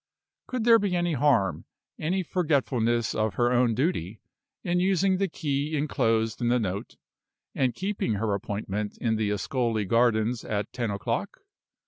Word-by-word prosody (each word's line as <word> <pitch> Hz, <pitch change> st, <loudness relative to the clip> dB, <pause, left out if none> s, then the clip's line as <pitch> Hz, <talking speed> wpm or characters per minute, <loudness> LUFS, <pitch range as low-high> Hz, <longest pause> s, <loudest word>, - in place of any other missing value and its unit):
Could 250 Hz, -3 st, -2 dB
there 230 Hz, 0 st, +6 dB
be 200 Hz, -3 st, 0 dB
any 175 Hz, -1 st, 0 dB
harm, 110 Hz, -, +2 dB, 0.3 s
any 185 Hz, +5 st, 0 dB
forgetfulness 130 Hz, -, +1 dB
of 110 Hz, -2 st, -1 dB
her 120 Hz, +1 st, +2 dB
own 120 Hz, -2 st, +3 dB
duty, 110 Hz, -, -1 dB, 0.4 s
in 175 Hz, +1 st, +1 dB
using 190 Hz, +1 st, +2 dB
the 195 Hz, +1 st, +1 dB
key 150 Hz, -2 st, -2 dB
inclosed 115 Hz, -6 st, 0 dB
in 120 Hz, -, +1 dB
the 120 Hz, +1 st, +3 dB
note, 100 Hz, -4 st, -3 dB, 0.6 s
and 130 Hz, -2 st, 0 dB
keeping 190 Hz, -, -1 dB
her 105 Hz, 0 st, -1 dB
appointment 100 Hz, +1 st, -3 dB
in 115 Hz, -2 st, 0 dB
the 110 Hz, -1 st, 0 dB
Ascoli 110 Hz, +1 st, -1 dB
gardens 115 Hz, +1 st, +2 dB
at 105 Hz, 0 st, -3 dB
ten 120 Hz, -3 st, -2 dB
o'clock? 100 Hz, -1 st, -3 dB
120 Hz, 150 wpm, -27 LUFS, 110-160 Hz, 0.6 s, there